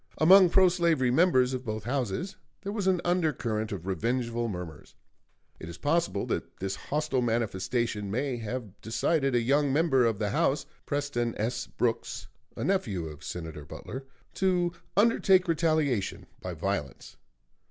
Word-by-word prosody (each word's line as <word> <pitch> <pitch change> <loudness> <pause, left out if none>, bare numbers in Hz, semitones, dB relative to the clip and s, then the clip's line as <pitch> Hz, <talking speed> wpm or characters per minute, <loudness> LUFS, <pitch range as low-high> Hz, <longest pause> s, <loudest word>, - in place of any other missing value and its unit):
Among 185 +3 +7
pro 190 +2 +6
slavery 170 -8 +2
members 130 -4 +4
of 130 0 -3
both 110 -3 -4
Houses 130 - -2 0.3
there 200 - -3
was 205 -3 -2
an 185 -2 +3
under 175 -3 +2
current 110 -4 -3
of 95 -4 -5
revengeful 115 +5 -1
murmurs. 90 -7 -7 0.6
It 80 - -8
is 85 - -8
possible 155 -8 0
that - - -4
this 95 0 -3
hostile 150 0 -1
manifestation 115 -2 -1
may 125 +4 -1
have 110 -3 -6
decided 135 +4 +1
a 120 - +3
young 140 +3 +2
member 140 -4 +3
of 115 -3 +1
the 105 -1 -1
House, 140 +6 +1 0.2
Preston 140 -5 -1
S. 115 +4 -2
Brooks, 115 -1 -2 0.3
a - - -3
nephew 110 - 0
of 75 -1 -9
Senator 80 -2 -6
Butler, 130 - -8 0.3
to 180 -2 +1 0.3
undertake 195 -4 +4
retaliation 155 - 0 0.2
by 90 -1 -5
violence. 80 -5 -4
125 Hz, 150 wpm, -28 LUFS, 105-160 Hz, 0.6 s, Among